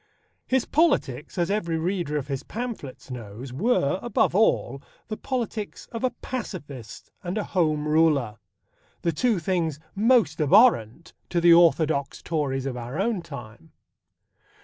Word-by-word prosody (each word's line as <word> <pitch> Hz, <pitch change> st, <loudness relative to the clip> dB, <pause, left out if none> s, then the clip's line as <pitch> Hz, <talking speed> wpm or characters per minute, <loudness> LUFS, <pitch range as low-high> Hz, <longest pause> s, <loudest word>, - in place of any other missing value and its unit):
His 260 Hz, -1 st, +2 dB
politics, 240 Hz, -, +1 dB
as 175 Hz, +2 st, +1 dB
every 170 Hz, -6 st, 0 dB
reader 170 Hz, -3 st, -1 dB
of 140 Hz, -, -4 dB
his 135 Hz, -2 st, -3 dB
pamphlets 220 Hz, -, -7 dB
knows, 120 Hz, +1 st, -8 dB
were, 180 Hz, -, +1 dB
above 240 Hz, -4 st, +1 dB
all, 140 Hz, -, +2 dB, 0.3 s
the 215 Hz, -, -2 dB
politics 230 Hz, -4 st, -4 dB
of 230 Hz, +1 st, -5 dB
a 255 Hz, -, +3 dB
pacifist 150 Hz, -, -7 dB
and 180 Hz, +3 st, -3 dB
a 210 Hz, -, 0 dB
Home 155 Hz, -6 st, 0 dB
Ruler 150 Hz, -8 st, +2 dB, 0.6 s
the 170 Hz, -, +2 dB
two 225 Hz, +7 st, +1 dB
things 165 Hz, -3 st, -1 dB
most 215 Hz, -, +3 dB
abhorrent 150 Hz, -, +4 dB, 0.2 s
to 175 Hz, -, +1 dB
the 170 Hz, 0 st, +7 dB
orthodox 160 Hz, -4 st, +3 dB
Tories 140 Hz, -5 st, -1 dB
of 135 Hz, -2 st, -3 dB
our 125 Hz, +6 st, -5 dB
own 210 Hz, -2 st, 0 dB
time. 120 Hz, -, -11 dB
165 Hz, 140 wpm, -25 LUFS, 140-210 Hz, 0.6 s, the